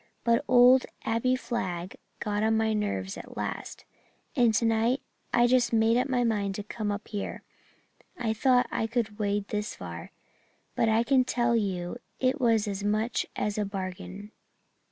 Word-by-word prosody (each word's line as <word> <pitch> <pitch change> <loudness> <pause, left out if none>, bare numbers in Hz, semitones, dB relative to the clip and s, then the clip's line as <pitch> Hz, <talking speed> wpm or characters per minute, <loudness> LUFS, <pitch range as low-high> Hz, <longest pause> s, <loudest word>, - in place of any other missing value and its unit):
But 235 +3 +3
old 250 +1 +6 0.2
Abbie 230 +3 +1
Flagg 190 -8 -4 0.2
got 210 0 -1
on 220 0 +2
my 220 0 +1
nerves 95 - -2
at - - -11
last, - - -5 0.5
and 240 -2 +4
tonight 225 +4 +2 0.3
I 240 - +4
just 250 0 +3
made 225 0 +4
up 255 +3 +1
my 250 -2 +2
mind 205 -4 0
to 205 - -4
come 210 0 -3
up 205 0 -5
here. 205 -2 -5 0.7
I 230 -3 0
thought 250 +2 +3
I 225 - 0
could 225 -2 -2
wade 205 -1 -1
this 210 0 -3
far, 85 -2 -8 0.7
but 225 - +2
I 220 +1 +3
can 260 +1 +4
tell 240 -1 +1
you 190 -3 -1 0.2
it 260 +2 +1
was 225 -3 +3
as 200 0 -3
much 215 +3 0
as 210 0 -1
a - - +2
bargain. 195 +1 -6
220 Hz, 165 wpm, -28 LUFS, 205-240 Hz, 0.7 s, old